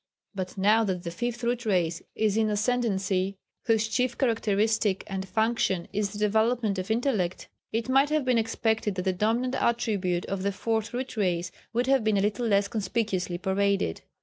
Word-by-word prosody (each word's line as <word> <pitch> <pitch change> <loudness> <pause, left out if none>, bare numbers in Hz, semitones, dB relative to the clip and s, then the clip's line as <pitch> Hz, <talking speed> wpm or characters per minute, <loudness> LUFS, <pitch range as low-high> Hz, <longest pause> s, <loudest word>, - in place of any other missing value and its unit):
But 190 0 -5
now 210 +4 +4
that 180 -3 -2
the 170 - -4
Fifth 240 +5 -3
Root 240 0 0
Race 175 -6 0
is 215 -2 +1
in 220 -1 +2
ascendency, 200 -4 0 0.3
whose 225 -2 +2
chief 240 +2 0
characteristic 215 -4 +1
and 190 -1 -4
function 220 -4 0
is 205 0 0
the 205 - -7
development 220 0 +1
of 185 - -5
intellect, 220 -6 0 0.2
it 225 +1 -1
might 270 +2 +4
have 305 -3 +1
been 250 -2 +3
expected 220 -2 0
that 180 - -2
the 190 - +1
dominant 230 +7 0
attribute 205 -9 0
of 195 -1 -3
the 200 +1 0
Fourth 220 +3 -1
Root 255 0 -4
Race 175 -4 0 0.2
would 240 +2 +1
have 265 -2 +3
been 215 -1 +2
a - - +2
little 210 +4 0
less 200 -1 +3
conspicuously 200 -4 -1
paraded. 190 - 0
215 Hz, 175 wpm, -27 LUFS, 190-230 Hz, 0.3 s, now